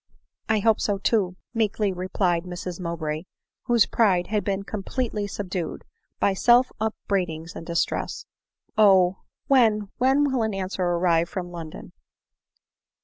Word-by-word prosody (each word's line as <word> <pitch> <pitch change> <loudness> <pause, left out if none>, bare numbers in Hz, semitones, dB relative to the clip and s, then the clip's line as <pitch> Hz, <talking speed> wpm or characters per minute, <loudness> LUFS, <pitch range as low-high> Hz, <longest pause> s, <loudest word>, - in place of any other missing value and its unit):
" - - -46
I 210 - +1
hope 225 0 +3
so 205 -1 0
too," 195 -3 +1 0.2
meekly 215 -3 0
replied 180 -1 0
Mrs 180 0 -6
Mowbray, 165 -2 -3 0.4
whose 240 -3 +4
pride 190 -6 +2
had 210 -1 -1
been 195 -1 -1
completely 210 +1 -3
subdued 190 -4 -4 0.3
by 200 - +3
self 245 +5 +4
upbraidings 180 -6 -2
and 165 - -8
distress; 170 0 -2 0.5
Oh! 190 -3 +5 0.3
when 220 -6 +3
— - - -55
when 265 +3 +4
will 260 -3 +1
an 220 -2 -1
answer 190 0 -3
arrive 170 -1 +2
from 180 -3 -5
London 165 -3 -8
195 Hz, 140 wpm, -25 LUFS, 175-220 Hz, 0.5 s, Oh